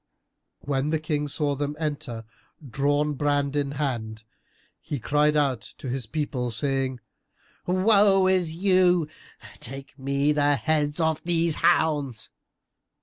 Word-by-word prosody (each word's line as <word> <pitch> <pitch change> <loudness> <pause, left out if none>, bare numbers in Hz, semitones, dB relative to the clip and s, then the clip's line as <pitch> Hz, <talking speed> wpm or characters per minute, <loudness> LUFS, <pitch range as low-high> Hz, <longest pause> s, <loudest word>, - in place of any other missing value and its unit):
When 140 +1 -1
the 160 - +1
King 150 -1 -2
saw 145 0 0
them 145 +1 -3
enter, 145 -7 -4 0.4
drawn 145 +4 0
brand 145 0 0
in 140 -1 -1
hand, 115 -6 -3 0.6
he 150 -2 -4
cried 150 +4 +2
out 135 -5 +1 0.2
to 130 - -7
his 125 -2 -3
people, 130 -3 -3
saying 130 +2 0 0.7
"Woe 195 +1 +4
to 190 - +5
you! 180 0 +3 0.5
Take 135 +1 -10
me 140 +2 +1
the 145 -1 +2
heads 145 +4 -1
of 160 -1 0
these 170 -1 +2
hounds!" 140 -8 +1
145 Hz, 125 wpm, -25 LUFS, 135-160 Hz, 0.7 s, to